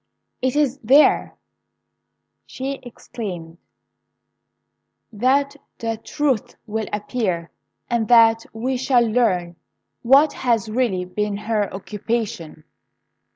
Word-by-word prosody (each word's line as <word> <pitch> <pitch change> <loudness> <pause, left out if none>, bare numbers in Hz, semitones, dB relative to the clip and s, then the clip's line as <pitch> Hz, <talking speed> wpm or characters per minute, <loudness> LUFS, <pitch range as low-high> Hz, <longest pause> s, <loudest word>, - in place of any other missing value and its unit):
'It 260 +1 0
is 285 -2 +1
there,' 275 +5 +4 1.1
she 270 +1 -5
exclaimed, 185 -8 -8 1.5
'that 275 +6 +1 0.2
the 225 -1 -2
truth 265 0 -2
will 220 -1 -3
appear, 200 - -2 0.4
and 235 -2 0
that 230 -1 +6
we 250 +4 -2
shall 245 -1 +3
learn 195 -7 +1 0.5
what 275 +5 +5
has 230 -5 0
really 215 -7 0
been 205 +2 -2
her 210 -1 -1
occupation!' 200 -5 -4
225 Hz, 95 wpm, -21 LUFS, 205-255 Hz, 1.5 s, that